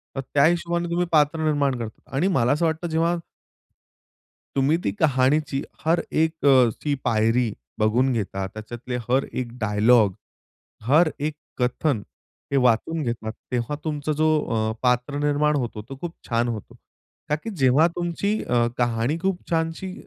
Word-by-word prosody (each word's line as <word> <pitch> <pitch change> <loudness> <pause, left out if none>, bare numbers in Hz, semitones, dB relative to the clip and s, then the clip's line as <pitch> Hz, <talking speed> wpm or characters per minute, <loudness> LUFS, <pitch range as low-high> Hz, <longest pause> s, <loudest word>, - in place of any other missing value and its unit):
तर 135 - -2
त्या 140 -1 +5
हिशोबाने 170 +1 +1
तुम्ही 175 +1 +1
पात्र 150 +1 +3
निर्माण 145 -4 +1
करतात. 110 -1 -7
आणि 145 +8 +2
मला 130 -10 +2
असं 155 +4 +2
वाटतं 160 +2 -1
जेव्हा 165 +2 +1 1.4
तुम्ही 140 +4 +3
ती - - 0
कहाणीची 140 0 +2 0.2
हर 165 +2 +3
एक 160 -1 0
अ, 130 -4 +6
ची 145 -1 0
पायरी 115 +1 +2 0.3
बघून 120 +5 +3
घेता. 95 -3 -2
त्याच्यातले 120 +4 -7
हर 130 +2 +3
एक 125 -2 -4
डायलॉग, 110 0 +4 0.7
हर 155 +8 +4
एक 150 +2 -1 0.2
कथन 125 0 0 0.5
हे 140 - +2
वाचून 125 +6 +2
घेतात. 115 -3 -3 0.2
तेव्हा 125 +3 -1
तुमचा 155 -1 -2
जो 155 +1 +2 0.4
अ, - - 0
पात्र 125 +3 +1
निर्माण 150 +1 +2
होतो 120 -5 -3
तो 135 - -7
खूप 175 -1 -4 0.2
छान 120 +1 +1
होतो. 110 -4 -6 0.5
का 150 - +3
की 190 +9 -7
जेव्हा 135 +4 +5
तुमची 175 +4 -1
अ, 120 -1 +2
कहाणी 120 +5 0
खूप 190 -1 -2
छानशी 165 +3 -1
140 Hz, 155 wpm, -24 LUFS, 120-160 Hz, 1.4 s, अ